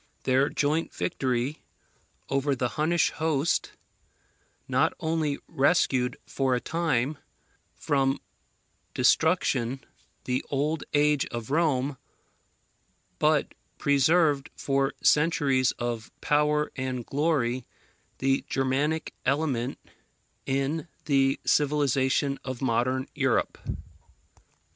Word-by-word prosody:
Their 135 Hz, +2 st, +3 dB
joint 155 Hz, +3 st, 0 dB
victory 130 Hz, -1 st, -1 dB, 0.7 s
over 140 Hz, +1 st, 0 dB
the 125 Hz, -1 st, -1 dB
Hunnish 160 Hz, +5 st, +1 dB
host 155 Hz, -1 st, 0 dB, 0.9 s
not -, -, +2 dB
only 160 Hz, -3 st, 0 dB
rescued 135 Hz, -4 st, +2 dB
for 130 Hz, -2 st, 0 dB
a -, -, 0 dB
time 150 Hz, -3 st, -1 dB, 0.6 s
from 135 Hz, -1 st, +1 dB, 0.8 s
destruction 135 Hz, -7 st, +2 dB, 0.4 s
the 125 Hz, 0 st, -1 dB
old 150 Hz, +3 st, -1 dB
age 150 Hz, -1 st, +3 dB
of 120 Hz, +1 st, -6 dB
Rome, 145 Hz, -4 st, +1 dB, 1.2 s
but -, -, +2 dB, 0.2 s
preserved 145 Hz, 0 st, +3 dB
for 135 Hz, 0 st, 0 dB
centuries 145 Hz, -4 st, +3 dB
of 120 Hz, -2 st, -4 dB
power 150 Hz, 0 st, +1 dB
and 130 Hz, -3 st, -3 dB
glory 135 Hz, -5 st, 0 dB, 0.5 s
the 135 Hz, 0 st, +1 dB
Germanic 140 Hz, +4 st, 0 dB
element 135 Hz, -2 st, 0 dB, 0.7 s
in 140 Hz, +5 st, -1 dB, 0.2 s
the 135 Hz, -2 st, +2 dB
civilization 140 Hz, -1 st, +2 dB
of 130 Hz, -2 st, -5 dB
modern 130 Hz, +1 st, 0 dB
Europe. -, -, 0 dB
140 Hz, 90 wpm, -27 LUFS, 130-150 Hz, 1.2 s, Their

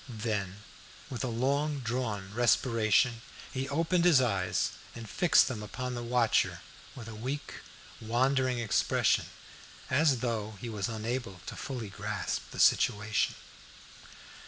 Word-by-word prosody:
Then 105 Hz, -3 st, -3 dB, 0.5 s
with 130 Hz, +1 st, -3 dB
a -, -, -1 dB
long 140 Hz, +5 st, 0 dB
drawn 110 Hz, -5 st, -3 dB
respiration, 115 Hz, 0 st, +3 dB, 0.3 s
he 135 Hz, +1 st, -3 dB
opened 165 Hz, +4 st, +1 dB
his 170 Hz, -6 st, +6 dB
eyes, 100 Hz, -8 st, 0 dB, 0.2 s
and 115 Hz, -2 st, -8 dB
fixed 175 Hz, -, +4 dB
them 120 Hz, -5 st, -4 dB
upon 125 Hz, +4 st, -5 dB
the 120 Hz, -, -4 dB
watcher 120 Hz, -1 st, +1 dB, 0.3 s
with 115 Hz, -4 st, -9 dB
a 115 Hz, -, -7 dB
weak, 130 Hz, +7 st, -5 dB, 0.4 s
wandering 130 Hz, +3 st, +1 dB
expression, 115 Hz, -3 st, +2 dB, 0.7 s
as 135 Hz, -2 st, +3 dB
though 110 Hz, -3 st, -2 dB
he 120 Hz, -, -5 dB
was 105 Hz, 0 st, -3 dB
unable 110 Hz, -3 st, -4 dB
to -, -, -6 dB
fully 120 Hz, -6 st, -5 dB
grasp 85 Hz, -, -3 dB
the -, -, -10 dB
situation. 105 Hz, -2 st, +3 dB
120 Hz, 130 wpm, -30 LUFS, 110-130 Hz, 0.7 s, his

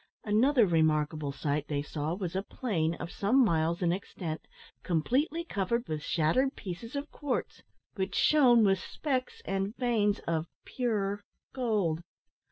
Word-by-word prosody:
Another 230 Hz, +4 st, +4 dB
remarkable 155 Hz, -3 st, +1 dB
sight 145 Hz, +1 st, -2 dB
they 145 Hz, -1 st, -1 dB
saw 150 Hz, +2 st, -3 dB
was 185 Hz, -2 st, -4 dB
a 190 Hz, -, +1 dB
plain, 170 Hz, -8 st, -1 dB
of 170 Hz, -, -6 dB
some 245 Hz, +6 st, +3 dB
miles 170 Hz, 0 st, +1 dB
in 170 Hz, -, +3 dB
extent, 170 Hz, -4 st, -5 dB, 0.4 s
completely 265 Hz, -, 0 dB
covered 235 Hz, -, -1 dB
with 155 Hz, -1 st, -3 dB
shattered 165 Hz, -, +1 dB
pieces 210 Hz, +6 st, -7 dB
of 280 Hz, +1 st, -4 dB
quartz, 285 Hz, -4 st, -3 dB, 0.3 s
which 190 Hz, -1 st, -3 dB
shone 250 Hz, -7 st, +5 dB
with 195 Hz, -2 st, +3 dB
specks 260 Hz, +5 st, -3 dB
and 195 Hz, +3 st, -2 dB
veins 220 Hz, -5 st, +2 dB
of 165 Hz, 0 st, -1 dB, 0.2 s
pure 205 Hz, -5 st, -1 dB, 0.3 s
gold. 210 Hz, -11 st, 0 dB
195 Hz, 140 wpm, -30 LUFS, 160-240 Hz, 0.4 s, shone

